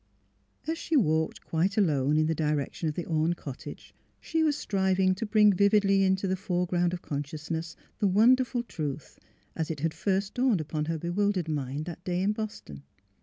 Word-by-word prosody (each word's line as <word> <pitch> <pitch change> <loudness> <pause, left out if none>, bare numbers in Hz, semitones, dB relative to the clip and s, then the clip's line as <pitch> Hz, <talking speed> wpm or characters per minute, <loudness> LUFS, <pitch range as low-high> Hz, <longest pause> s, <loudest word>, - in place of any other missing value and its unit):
As 325 +2 -2
she 325 - -2
walked 160 - +1
quite 180 +5 0
alone 150 -7 +2
in 155 - +3
the 160 - +1
direction 150 +1 -1
of 150 - -5
the 175 - -3
Orne 160 +1 +1
cottage 140 -6 -9 0.3
she 325 -1 -1
was 300 -2 +2
striving 190 -4 +1
to 200 +4 -4
bring 210 -1 +5
vividly 200 0 +4
into 190 +1 +1
the 190 - +1
foreground 180 -2 0
of 175 -1 -5
consciousness 155 +3 -4 0.2
the 205 - +3
wonder 230 +7 +5
ful 245 -1 -3
truth, 155 - -6 0.4
as 160 -1 -2
it 155 -4 -4
had 160 0 0
first 195 +4 -1
dawned 245 -6 +2
upon 155 0 -3
her 165 +1 -2
bewil 190 +6 0
dered 180 -4 -2
mind 145 -1 -3
that 175 0 -8
day 180 0 -1
in 200 - +2
Boston. 210 - -6
180 Hz, 185 wpm, -28 LUFS, 155-200 Hz, 0.4 s, bring